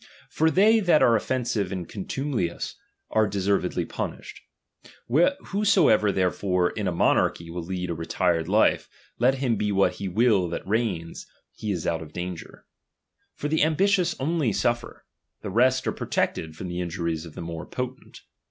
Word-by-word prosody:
For 160 +1 +2
tliey 215 +5 +4
that 170 -4 +4
are 115 - +5
offensive 115 -4 -1
and 90 -3 -4
contumelious, 115 -3 -3 0.4
are 110 -1 +3
de 100 0 -4
servedly 100 +1 0
punished. - - -6 0.7
Whosoever 175 - +3
therefore 90 -1 +1
in 105 -3 -3
a - - +1
mo 85 - +3
^archy 85 0 -1
will 90 +1 -4
lead 90 +1 -4
a - - 0
retired 80 0 0
life, 105 +4 +2 0.3
let 130 +3 +4
him 130 -4 0
be 105 0 0
what 100 0 +2
he 100 - -4
will 100 -2 +2
that 85 - -5
reigns, 100 -7 -2 0.3
he 105 - -4
is 85 -5 -3
out 80 -1 -1
of 75 -1 -10
danger. 90 -1 -7 0.7
For 145 - -3
the 155 +1 +1
am 155 +1 +3
t* 190 - +2
i - - +5
tious 180 -4 +2
only 150 -3 0
suffer; 120 +5 -2 0.4
the 100 - -5
rest 130 +5 +3
are - - +1
protected 80 -1 -2
from 90 - -6
the 90 0 -4
i^tijuries 85 -2 -3
of 80 - -14
the - - -6
more 85 -1 -6
potent. 125 -1 -6
100 Hz, 175 wpm, -25 LUFS, 90-130 Hz, 0.7 s, are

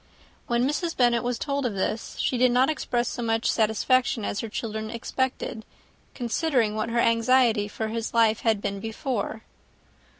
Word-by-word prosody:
When 240 +1 +2
Mrs. 330 +4 -2
Bennet 240 -2 +3
was 245 -1 -2
told 280 +2 -2
of 235 -5 -1
this, 215 +4 -3
she - - 0
did 250 0 +4
not 255 +4 +3
express 245 -5 -1
so 245 - -4
much 225 0 +1
satisfaction 225 +1 +1
as 205 - -2
her 225 - -4
children 220 0 -4
expected, 240 0 -3 0.5
considering 240 -2 0
what 215 +1 -2
her 235 - -2
anxiety 230 -2 +3
for 220 +1 -4
his 225 0 -3
life 225 -2 +3
had 220 -3 +1
been 200 0 -2
before. 220 0 -3
230 Hz, 165 wpm, -26 LUFS, 220-255 Hz, 0.5 s, did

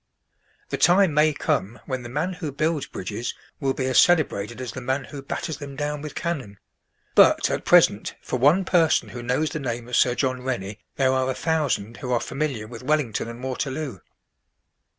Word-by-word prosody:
The - - -2
time 180 -1 +5
may 150 +1 +4
come 115 -5 -1
when 130 -2 -3
the 120 - -8
man 155 +9 -1
who 165 -5 -5
builds 155 +1 -1
bridges 105 +5 -5 0.2
will 135 -2 0
be 130 - -2
as 130 -1 +4
celebrated 130 - +2
as 125 -3 -4
the 130 - -7
man 130 +2 -1
who 140 0 -8
batters 145 +2 -4
them 140 -2 -8
down 150 +1 -3
with 150 -1 -7
cannon; 135 - -3 0.6
but, - - +5
at - - -2
present, - - +4
for 125 - -3
one 155 +9 +4
person 165 -4 +3
who 120 - -7
knows 125 +6 0
the 155 - -3
name 120 -3 -4
of 125 - -2
Sir 125 0 +4
John 130 -2 -1
Rennie 110 -5 -4 0.2
there 130 -1 +2
are 130 0 +1
a 130 - -1
thousand 140 -9 -1
who 125 -3 -5
are 120 - +3
familiar 135 -7 -3
with 115 +1 -9
Wellington 135 -5 0
and 115 +2 -8
Waterloo. 130 -3 -3
130 Hz, 190 wpm, -24 LUFS, 120-150 Hz, 0.6 s, time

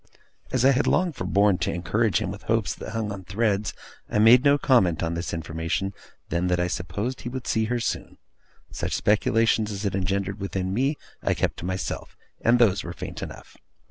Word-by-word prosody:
As 130 -1 +2
I 135 - +7
had 135 +1 +1
long 180 -1 +2
forborne 100 -6 +2
to - - 0
encourage 100 +5 +1
him 95 - -3
with 100 - -8
hopes 115 -2 +1
that - - -8
hung 110 -2 -2
on 100 -2 -6
threads, 100 +2 0 0.4
I - - -1
made 115 +4 +7
no 140 -1 +6
other - - 0
comment 95 - +3
on 80 0 -1
this 85 +1 -3
information 85 +4 -2 0.4
than 85 +2 0
that 90 -1 +1
I 90 - +2
supposed 100 +8 -3
he 120 - -5
would 130 0 -6
see 110 -1 +1
her 120 +2 -1
soon. 115 - -3 0.5
Such - - -3
speculations 110 +1 +2
as 100 +1 -4
it 100 - 0
engendered 95 +1 -1
within 95 -1 -2
me 135 +7 +1 0.3
I - - +1
kept - - -1
to - - -6
myself, 95 +1 -4 0.3
and 120 +1 +5
those 110 -5 +3
were 85 - -6
faint - - -7
enough. - - -9
100 Hz, 205 wpm, -25 LUFS, 95-115 Hz, 0.5 s, I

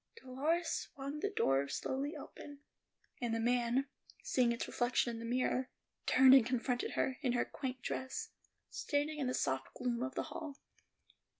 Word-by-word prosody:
Dolores 310 - 0
swung 280 +2 -4
the 405 - 0
door 140 - +2
slowly 275 - -2
open, 285 -1 -10 0.6
and 235 -2 0
the - - 0
man, 245 +3 +2 0.4
seeing 245 -2 +3
its 235 - -2
reflection 245 0 +1
in 230 - -6
the 230 - -6
mirror, 255 +2 0 0.4
turned 260 0 +8
and 265 -3 +9
confronted 250 +1 -1
her, 260 +1 0
in 255 -5 +1
her 245 - +2
quaint 260 -2 -5
dress, 445 +13 -3 0.4
standing 300 +1 -1
in 270 - 0
the 255 - 0
soft 130 0 -1
gloom 245 -1 -1
of 260 +1 -3
the - - 0
hall. 300 -4 -6
255 Hz, 165 wpm, -35 LUFS, 240-285 Hz, 0.6 s, and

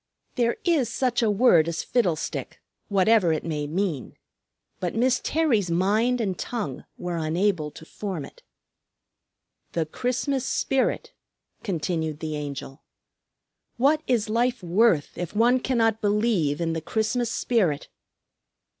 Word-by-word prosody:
There 235 -1 +1
is 310 -9 +2
such 245 -1 0
a 225 - +3
word 200 -7 +5
as 170 -1 -2
Fiddlestick, 180 -11 -1 0.3
whatever 200 -2 +4
it 155 - -1
may 150 -3 -3
mean. 165 - -2 0.6
But 180 +1 -3
Miss 250 +2 +2
Terry's 260 - +1
mind 210 +8 +2
and 195 -5 -1
tongue 205 - -4
were 175 -1 -3
unable 165 0 0
to 160 - -13
form 185 -5 -5
it. - - -16 1.3
"The 165 -2 0
Christmas 255 - -1
spirit!" 270 0 0 0.5
continued 160 -4 -2
the 155 -1 -3
Angel. 140 -2 -6 1.0
"What 290 +5 +3
is 230 -4 +1
life 240 0 0
worth 175 -3 +2
if 175 +2 -5
one 240 +4 +4
cannot 225 -4 +1
believe 205 -8 +1
in 165 -1 0
the 165 - -3
Christmas 220 +7 -1
spirit?" 190 - 0
205 Hz, 130 wpm, -25 LUFS, 165-240 Hz, 1.3 s, word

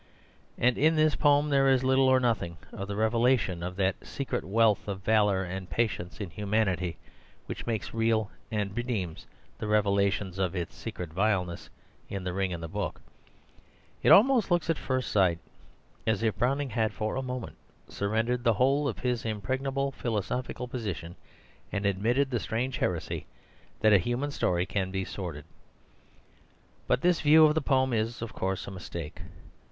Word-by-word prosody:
And 125 0 +2
in 160 +3 +4
this 155 -1 +4
poem 145 0 +3
there 135 -1 +4
is 130 -1 +3
little 130 0 +4
or 130 0 +5
nothing 115 -9 0 0.2
of 100 - -5
the 100 - -4
revelation 110 -4 +2
of 90 +1 -4
that 95 -1 0
secret - - -3
wealth 105 +4 +2
of 95 -1 -4
valour 105 -3 +3
and 95 0 -6
patience 90 -3 -2
in 100 -5 -5
humanity 95 -4 0 0.5
which - - -7
makes 115 -3 -2
real 115 -2 +1 0.2
and 105 -3 -2
redeems 115 -9 -3 0.3
the - - -3
revelation 100 -2 +1
of 95 -1 0
its 85 -2 -3
secret 85 -3 -6
vileness 95 -2 0 0.4
in 100 -2 -4
The 90 -1 -3
Ring 95 0 -1
and 85 -1 -5
the - - -4
Book. - - -4 1.0
It - - +3
almost 240 +1 +6
looks 175 -2 +2
at 165 - -1
first 130 -1 -2
sight 95 -5 +3 0.7
as 110 0 +1
if 110 -4 +1
Browning 135 +4 0
had 110 -2 0
for 110 0 -2
a 130 - -1
moment 125 -2 -5 0.3
surrendered 115 +4 -1
the 115 -2 +4
whole 135 +6 +2
of 115 - -3
his 125 -2 -1
impregnable 130 +6 -2
philosophical 125 +1 -3
position 100 - -5 0.6
and 100 0 -2
admitted 115 +8 +1
the 120 - 0
strange 120 +5 -2
heresy 85 -3 -2 0.5
that 110 -1 +5
a 100 - +7
human 120 - -2
story 90 -9 0
can 95 -1 -2
be 95 0 -2
sordid. 85 -8 -6 1.4
But 125 - +2
this 175 -1 +3
view 155 +1 +7
of 150 - +4
the 160 - +1
poem 130 -2 +2
is, 115 +1 -1
of 115 - -6
course, 95 0 -2
a - - -7
mistake. 85 -4 -7
110 Hz, 170 wpm, -28 LUFS, 95-130 Hz, 1.4 s, a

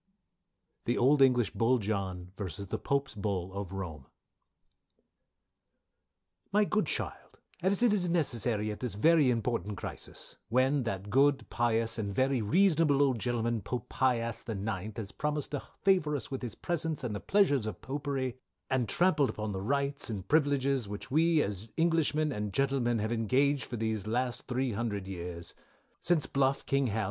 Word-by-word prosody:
THE 120 - +1
OLD 135 +3 +4
ENGLISH 125 -4 +4
BULL 120 +2 +2
JOHN 95 -4 -3
v. 95 -1 -4
THE 95 - -4
POPE'S 140 0 -1
BULL 95 -3 -3
OF 100 -2 -5
ROME. 80 -8 -6 2.4
"My 210 +1 +4
good 215 +1 +1
Child - - -5 0.2
as 195 +5 +2
it 235 -4 +5
is 180 -4 +1
necessary 120 - +1
at 105 - -7
this 120 -6 -3
very 155 +4 +5
important 115 -4 -1
crisis; - - -6
when, 130 +4 +3
that 100 -2 -4
good 140 +3 +3
pious 115 -1 +1
and 100 -2 -2
very 130 +3 +1
reasonable 160 - +3
old 130 -4 +1
gentleman 115 0 0
Pope 120 +4 -5
Pi 130 -1 +2
ass 115 0 -3
the 110 - -5
nineth 100 0 -4
has 105 -3 -5
promised 150 -1 -2
to 145 - -2 0.2
favour 180 -7 +3
us 135 -2 -5
with 135 - -3
his 120 -5 -5
presence, 160 -4 -2
and 115 -4 -2
the - - -3
pleasures 145 - +2
of 110 - -5
Popery 135 0 -3 0.3
and 125 -5 +1
trampled 170 - +2
on 110 -1 -2
the 95 -1 -4
rights 140 +5 -1
and 100 -4 -5
privilages 140 -5 +2
which, 105 +5 -7
we, 160 +1 +4
as 100 +2 -5
Englishmen, 160 -2 +2
and 105 -4 -3
Protestants, 120 -4 +1
have 110 - -2
engaged 130 +5 +2
for 120 - -5
these 110 -2 -2
last 125 +2 -1
three 130 0 0
hundred 105 -3 -3
years 85 -2 -6 0.5
Since 170 -4 +1
Bluff, 135 0 +1
king 140 -1 +1
Hal. 110 0 -1
125 Hz, 165 wpm, -31 LUFS, 105-140 Hz, 2.4 s, it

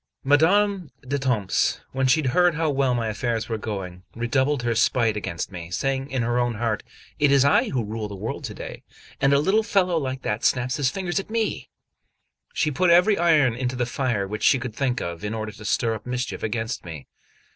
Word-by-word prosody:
XL 135 - -6
MADAME 185 +4 +3 0.2
D'ETAMPES, 125 -7 0
when 130 0 0
she 155 +4 +3
heard 175 +6 +3
how 160 -1 +1
well 135 -2 +1
my 115 -2 -1
affairs 115 +1 -2
were 110 -2 -3
going, 95 -4 -5
redoubled 130 +3 0
her 120 -1 +1
spite 115 -1 +2
against 85 -3 -4
me, 85 -2 -7
saying 135 +8 -2
in 130 -4 -1
her 120 +1 0
own 120 -1 0
heart: 110 -1 -1 0.4
"It 145 -1 +4
is 140 -1 +5
I 140 - +3
who 125 -4 -1
rule 110 0 -4
the 100 - -8
world 95 - -5
to - - -6
day, - - -8 0.4
and 135 - +4
a 140 - +5
little 190 +9 +3
fellow 185 -5 +1
like 130 -2 -4
that 105 +2 -2
snaps 125 0 +1
his 140 -3 +2
fingers 185 +3 -2
at 195 - -7
me! 225 -1 -2 0.8
She 155 -5 0
put 180 +5 +2
every 180 +4 +5
iron 155 -8 +4
into 125 +1 -3
the 125 -1 0
fire 120 -5 -1
which 105 +2 -5
she - - +5
could 125 -3 -5
think 125 0 -1
of, 85 +1 -5
in 105 +2 -3
order 110 -1 -4
to 105 +1 -12
stir 115 +2 +1
up 110 +2 -8
mischief 125 0 -3
against 115 +2 -3
me. 80 -5 -8
125 Hz, 210 wpm, -24 LUFS, 110-145 Hz, 0.8 s, is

